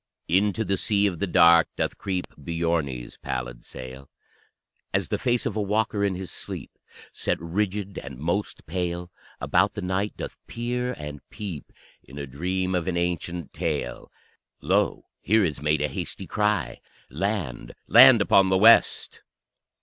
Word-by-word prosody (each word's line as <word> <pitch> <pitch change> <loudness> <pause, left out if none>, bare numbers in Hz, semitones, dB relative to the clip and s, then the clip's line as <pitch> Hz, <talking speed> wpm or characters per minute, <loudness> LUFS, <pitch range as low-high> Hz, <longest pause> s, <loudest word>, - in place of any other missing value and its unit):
Into 100 +5 +2
the 100 -1 0
Sea 100 +2 +1
of 90 -5 -1
the 100 - 0
Dark 85 -1 +6
doth - - -1
creep 95 -2 -2
Björne's 80 -5 -2
pallid - - -5
sail, 65 +2 -9 0.9
As - - 0
the - - -1
face 120 -1 0
of 105 - -2
a 110 - 0
walker 105 0 0
in 100 -2 +1
his 95 0 -6
sleep, - - -7 0.4
Set - - -1
rigid 100 +3 -2
and 70 -3 -9
most 85 +9 -3
pale, 90 +1 -3 0.3
About 95 +4 +2
the 105 - -4
night 95 +3 -1
doth - - -7
peer 125 +1 -2
and 75 -1 -7
peep 95 - -7 0.3
In 70 - -13
a 70 - -4
dream 90 +7 -2
of 90 -1 -1
an 90 -2 -1
ancient 85 -2 -3
tale. 60 - -3 0.5
Lo, - - +1 0.2
here 110 0 +3
is 75 -5 -3
made 75 0 +1
a - - +2
hasty 65 - -6
cry: 105 -1 -1 0.3
_Land, 85 - -3
land, 120 -2 +8
upon 95 -1 +4
the 95 - +3
west! 115 +4 +5
90 Hz, 155 wpm, -25 LUFS, 75-105 Hz, 0.9 s, land